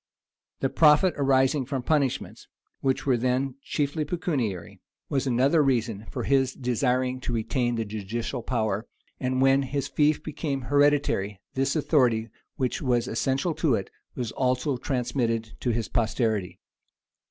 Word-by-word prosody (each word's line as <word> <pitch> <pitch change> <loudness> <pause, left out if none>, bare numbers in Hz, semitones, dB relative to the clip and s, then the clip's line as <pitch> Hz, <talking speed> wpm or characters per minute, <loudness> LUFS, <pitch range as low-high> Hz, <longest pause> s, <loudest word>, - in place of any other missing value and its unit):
The 135 - +1
profit 155 +5 +5
arising 135 0 +2
from 135 -3 -3
punishments, 140 -3 -1 0.3
Which 130 -1 0
were 130 -3 +3
then 130 +2 0
chiefly 145 +2 -1
pecuniary, 140 - -3 0.3
was 135 -1 0
another 130 +6 +3
reason 115 -5 0
for - - -4
his 135 -2 +2
desiring 125 +1 0
to 125 - -4
retain 120 +2 0
the 115 -1 -2
judicial 110 +4 -4
power; 110 -3 -1 0.3
and 130 0 0
when 135 +1 +5
his 140 +1 -2
fief 150 +2 +2
became 145 -3 -3
hereditary, 145 -8 +2
this 135 +2 0
authority, 125 -8 +2 0.3
which 130 -2 -1
was 125 -3 +1
essential 135 +8 0
to 155 -5 +2
it, 95 - -4 0.2
was 120 -4 -3
also 130 +2 0
transmitted 120 -4 -1
to 125 - -1
his 115 -1 -1
posterity. 110 -6 -1
130 Hz, 140 wpm, -26 LUFS, 115-140 Hz, 0.3 s, profit